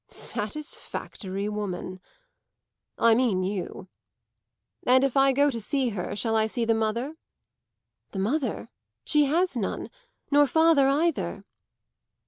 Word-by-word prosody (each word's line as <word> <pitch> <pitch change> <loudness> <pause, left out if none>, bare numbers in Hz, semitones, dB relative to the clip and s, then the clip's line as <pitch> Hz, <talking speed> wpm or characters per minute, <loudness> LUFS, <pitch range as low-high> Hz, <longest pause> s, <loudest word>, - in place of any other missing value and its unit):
"Satisfactory 210 - -3
woman! 185 -3 -4 1.0
I 230 0 +5
mean 225 -6 +2
you. 190 -1 -4 1.0
And 255 +1 +5
if 275 -1 0
I 270 0 +5
go 285 +2 +3
to 230 -3 -4
see 260 +4 +1
her 195 -5 -4
shall 225 +1 0
I 220 0 +3
see 230 +1 -2
the 225 - +3
mother?" 230 +7 -2 0.9
"The - - -8
mother? 230 +3 -1 0.4
She 300 -1 +3
has 335 +3 +1
none 215 -5 -3 0.4
nor 290 0 +5
father 320 -2 +4
either." 300 +3 0
240 Hz, 120 wpm, -26 LUFS, 210-285 Hz, 1.0 s, I